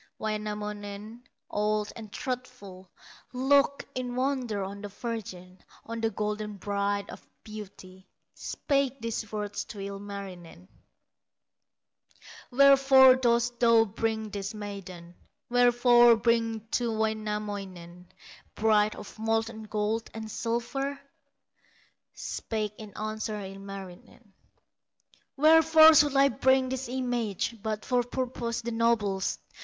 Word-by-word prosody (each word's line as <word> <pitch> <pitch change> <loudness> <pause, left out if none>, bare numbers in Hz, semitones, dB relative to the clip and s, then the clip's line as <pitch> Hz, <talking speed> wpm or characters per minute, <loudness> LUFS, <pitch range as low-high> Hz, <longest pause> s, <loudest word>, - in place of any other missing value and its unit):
Wainamoinen, 210 +1 -5 0.3
old 210 0 0
and 215 -3 -10
truthful, 250 -9 -6 0.4
Looked 280 +2 +2
in 250 -1 -4
wonder 255 -6 -1
on 200 +1 -7
the 205 - -5
virgin, 190 -4 -7 0.3
On 230 0 -5
the 225 - +1
golden 210 -1 -4
bride 200 0 -1
of - - -11 0.2
beauty, 190 -3 -11 0.3
Spake 275 -2 -1
these 225 -2 -4
words 210 -1 -3
to 210 - -10
Ilmarinen: 195 - -8 1.8
"Wherefore 270 0 +7
dost 240 -1 +1
thou 230 -2 +5
bring 220 0 -3
this 200 +2 -5
maiden, 190 -4 -8 0.4
Wherefore 240 -1 +6
bring 225 -1 +1
to 240 -2 0
Wainamoinen 205 -5 -4 0.5
Bride 215 -1 +3
of 210 - -11
molten 225 0 -1
gold 215 +1 -2
and 220 -1 -6
silver?" 260 +5 -2 1.2
Spake 215 -2 -4
in 210 -2 -10
answer 215 0 -3
Ilmarinen: 195 +1 -10 1.0
"Wherefore 320 +1 +7
should 295 -2 +4
I 275 0 +5
bring 260 +2 +2
this 260 -1 -4
image, 240 -4 -2
But 215 0 -3
for 250 -1 +2
purposes 240 -1 -3
the 235 - -3
noblest? 225 -4 0
220 Hz, 105 wpm, -28 LUFS, 205-245 Hz, 1.8 s, Wherefore